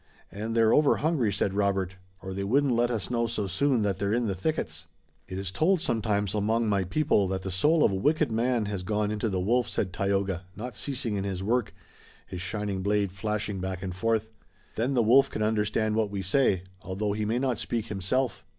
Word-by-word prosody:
"And 110 +4 -4
they're 115 -1 +5
over 150 -1 +5
hungry," 145 -9 +1
said 100 -1 0
Robert, 95 -2 0 0.3
"or 95 0 -5
they 100 +1 -3
wouldn't 135 +6 +2
let 120 +1 +2
us 115 -2 -3
know 120 -1 +1
so 110 -3 -2
soon 115 +5 +1
that 100 -2 -1
they're 100 0 0
in 120 0 +1
the 100 - 0
thickets." 155 - -3 0.4
"It 95 - -6
is 95 -1 -4
told 170 - +2
sometimes, 105 - 0
among 110 +2 +1
my 100 -3 +1
people, 105 - +2
that 95 0 -3
the 95 - -4
soul 150 - +3
of - - +4
a - - -1
wicked 150 +7 +1
man 115 0 +1
has 100 -2 -3
gone 105 +2 -1
into 105 +1 -1
the 95 -2 -1
wolf," 120 +6 +1
said 90 -2 -2
Tayoga, 95 -1 -1
not 115 +3 -6
ceasing 120 -2 -2
in 95 - -2
his 95 -1 -3
work, 115 +2 0 0.5
his 90 - -7
shining 100 +1 -3
blade 100 -1 +1
flashing 105 0 -3
back 95 0 -4
and 90 -2 -4
forth. 110 +2 0 0.4
"Then 125 +5 -1
the 120 - +4
wolf 135 +5 +5
can 110 - -2
understand 105 0 +1
what 110 -1 +1
we 100 -1 -4
say, 95 -3 +2 0.2
although 100 +2 -2
he 105 +1 -2
may 110 +3 0
not 125 -3 0
speak 115 -2 -2
himself." 115 +5 -1
105 Hz, 215 wpm, -27 LUFS, 95-120 Hz, 0.5 s, they're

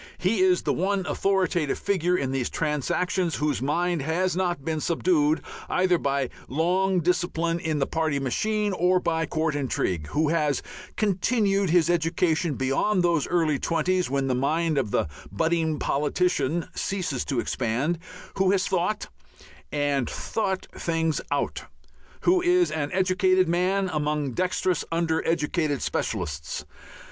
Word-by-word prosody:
He 190 +3 +1
is 185 -1 +3
the - - +1
one 190 +1 0
authoritative 185 -7 0
figure 180 -2 +1
in 130 -5 -1
these 135 -2 -1
transactions 165 +3 -1
whose 145 0 -1
mind 170 +4 0
has 175 +6 0
not 175 -6 -1
been 160 -2 -1
subdued 160 -2 +2 0.3
either 180 -2 +2
by 140 -2 -1 0.2
long 180 +5 +1
discipline 170 -1 0
in 160 -2 -1
the 135 - +1
party 160 -2 -1
machine 210 - 0
or 180 +1 +3
by 165 -2 -1
court 155 -1 0
intrigue, 95 - -1
who 150 +1 +1
has 150 -4 +1 0.3
continued 200 -1 +1
his 170 -1 +4
education 165 -2 +1
beyond 135 +10 +1
those 170 -4 +2
early 160 -5 +1
twenties 175 +1 0
when 135 0 0
the 130 - +1
mind 155 +4 +1
of 120 -6 -1
the 90 - +1 0.2
"budding 160 - 0
politician" 165 +3 0
ceases 180 -10 -2
to 135 -4 -1
expand, 130 +8 -1 0.4
who 190 -1 +4
has 190 -1 +2
thought, 190 +3 -1 0.6
and 145 -3 0
thought 190 -4 -2
things 165 -2 -1
out, - - -2 0.6
who 360 +1 +3
is 355 0 +3
an 145 -2 -2
educated 185 0 +3
man 185 +3 +1
among 150 -2 -1
dexterous 180 +3 0
under 165 -1 0
educated 155 -3 0
specialists. 80 -8 -3
165 Hz, 140 wpm, -25 LUFS, 145-185 Hz, 0.6 s, his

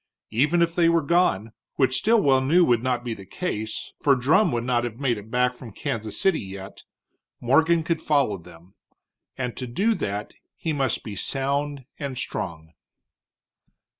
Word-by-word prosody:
Even 150 +10 +3
if 170 0 0
they 170 -1 +4
were 165 -1 +3
gone, 140 - +2 0.2
which 130 -1 +2
Stilwell 195 - +4
knew 170 +7 +4
would 120 -4 +3
not 125 -1 -1
be 120 -2 -3
the 100 - -10
case 110 - -4
for 140 -2 +5
Drumm 155 - +3
would 120 -1 -1
not 120 -1 +1
have 120 0 -5
made 125 -6 0
it 105 +2 -13
back 125 +1 +2
from 125 -2 -11
Kansas 110 +1 -4
City 190 -5 +3
yet, 95 0 -9 0.5
Morgan 160 +7 +3
could 165 0 -1
follow 140 -9 +2
them. 85 +2 -16 0.6
And 125 -2 -3
to 125 - -4
do 200 - +1
that 105 - -4 0.2
he 160 - -2
must 135 -5 -1
be 105 - -6
sound 140 +3 -1
and 140 -3 -4
strong. 80 -8 -5
130 Hz, 165 wpm, -25 LUFS, 110-155 Hz, 0.6 s, for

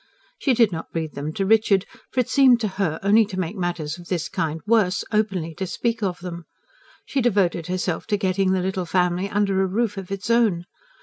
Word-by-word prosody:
She 265 -4 +2
did 230 -3 +4
not 165 -1 -6
breathe 160 -2 -3
them 145 +2 -4
to 195 - -1
Richard; 205 -2 +3 0.2
for 255 - +1
it 245 - -4
seemed 260 -4 +5
to 215 - +1
her 160 -4 0
only 210 +3 +5
to 190 -2 -5
make 180 +2 -3
matters 175 -4 -3
of 175 - -12
this 175 -4 -2
kind 160 0 -2
worse, 210 -4 +2
openly 195 -7 0
to 190 +4 -4
speak 230 +4 -2
of 180 -4 -2
them. 175 -2 -7 0.6
She 275 - -1
devoted 190 -8 +1
herself 180 -2 -2
to 210 -2 +1
getting 190 -1 +1
the 190 -1 +1
little 190 -1 -2
family 180 +2 +1
under 200 -2 +1
a 190 - +2
roof 210 +2 -1
of 190 -2 -6
its 195 +4 -3
own. 215 -8 +2
190 Hz, 210 wpm, -23 LUFS, 175-215 Hz, 0.6 s, seemed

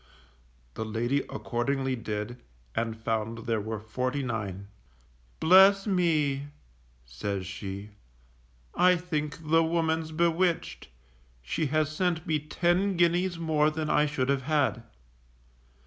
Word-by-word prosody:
_ - - -31 0.7
The - - -4
lady 115 +5 0
accordingly 130 +6 -1
did, 110 +1 -5 0.3
and 115 -1 -2
found 115 0 -3
there 115 -2 0
were 110 +1 -4
forty 125 +6 -2
nine. 100 -5 -4 0.7
Bless 195 +3 +6
me! 155 -8 +1 0.6
says 95 +11 -4
she. 100 +2 -7 0.8
_I 180 -1 +4
think 155 -2 -4
the 165 0 +6
woman's 160 -1 0
bewitched, 170 +1 0 0.6
she 105 - -1
has 155 +1 0
sent 175 -1 0
me 155 -3 +1
ten 175 +5 0
guineas 175 +1 +2
more 155 -2 +2
than 155 0 -2
I 150 - +3
should 135 -3 -1
have 140 -1 +2
had. 145 -5 +1
150 Hz, 120 wpm, -28 LUFS, 115-165 Hz, 0.8 s, Bless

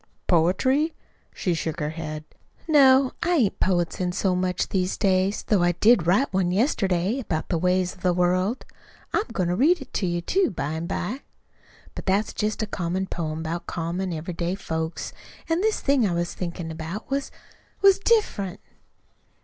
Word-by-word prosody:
"Poetry?" 260 - +2 0.4
She 180 - -1
shook 160 0 -3
her 150 -1 -2
head. 155 -2 -6 0.4
"No. 270 -4 +6
I 350 +1 +2
ain't 230 - +1
poetizin' 180 0 0
so 185 0 +1
much 180 0 -1
these 185 -1 0
days, 190 +1 +1
though 205 -4 +2
I 175 0 +3
did 210 -1 +4
write 200 +7 +2
one 185 -2 +1
yesterday 195 - +1
about 160 -10 -3
the 170 - 0
ways 180 +1 +1
of 180 - -19
the 180 - +2
world. 180 +6 +1 0.5
I'm 425 - +1
goin' 180 -3 -1
to 175 - +1
read 325 - +4
it 270 - -11
to 190 - 0
you, 175 0 -1
too, 375 - +1
by 150 -7 -3
an' 160 +1 -4
by. 235 +7 -3 0.7
But - - -8
that's 200 +3 +1
jest 215 +1 -1
a - - 0
common 185 -1 -2
poem 160 -3 -4
about 165 +2 -4
common, 175 +3 -3
every 165 +2 -4
day 170 +2 -2
folks. 160 -4 -4 0.3
An' 330 +2 +1
this 435 +1 +1
thing 275 -6 +3
I 175 - -1
was 175 0 -2
thinkin' 170 -2 -5
about 160 +9 -6
was 275 0 -1 0.5
was 390 -1 +7
diff'rent." 395 - +1
185 Hz, 175 wpm, -25 LUFS, 170-230 Hz, 0.7 s, was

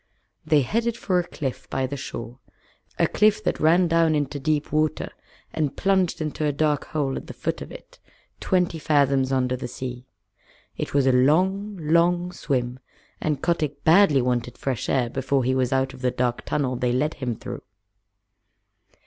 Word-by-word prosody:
They 155 -1 +3
headed 230 - -1
for 185 -5 +1
a 175 - -3
cliff 135 -7 -5
by 135 -1 -1
the 135 +2 -4
shore 120 -2 -7 0.6
a - - +3
cliff 215 0 +2
that - - -1
ran 170 +3 +4
down 165 -1 +3
into 145 -1 -2
deep 150 +1 -1
water, 155 0 0 0.4
and 150 -4 -1
plunged 190 -3 +1
into 155 0 -3
a 150 - +2
dark 150 0 0
hole 140 -3 -1
at - - -8
the - - -9
foot - - -3
of - - -8
it, - - -13 0.4
twenty 180 -3 0
fathoms 140 -3 +2
under 130 -1 +1
the 125 - -5
sea. 125 0 -7 0.7
It - - -4
was 140 -2 +4
a 130 - +5
long, 185 +10 +2
long 175 +2 +2
swim, 125 -7 -2 0.4
and 150 -3 -1
Kotick 150 -4 -1
badly 160 -6 +5
wanted 120 -1 -1
fresh 130 -5 -3
air 130 -3 +2
before 135 +2 0
he 130 +2 +1
was 130 -1 +1
out 130 0 +1
of 130 - -12
the 130 - +2
dark 125 -1 -1
tunnel 130 -4 -1
they 125 -1 0
led 145 +5 0
him 125 -4 -3
through. - - -7
145 Hz, 175 wpm, -24 LUFS, 130-165 Hz, 0.7 s, a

